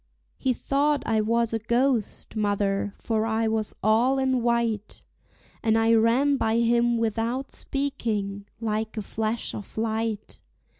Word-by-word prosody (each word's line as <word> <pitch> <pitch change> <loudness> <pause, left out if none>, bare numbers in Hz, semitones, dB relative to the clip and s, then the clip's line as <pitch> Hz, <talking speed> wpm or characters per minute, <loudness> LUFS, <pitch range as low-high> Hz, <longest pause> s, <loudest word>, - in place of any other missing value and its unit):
He 260 - +1
thought 285 +4 +1
I 220 -1 +2
was 230 +1 +1
a 225 - 0
ghost, 235 0 0
mother, 205 -1 0
for 220 -1 -1
I 225 0 +1
was 220 -1 -1
all 230 +6 +3
in 260 -2 +1
white; 235 -3 -1 0.6
And 225 0 +2
I 225 0 +4
ran 240 +6 +4
by 225 -2 +1
him 235 0 +3
without 230 +4 -1
speaking, 210 -8 -2
like 220 0 -2
a 215 - -2
flash 220 +3 -2
of 205 - -8
light. 220 -1 -2
225 Hz, 140 wpm, -26 LUFS, 215-240 Hz, 0.6 s, I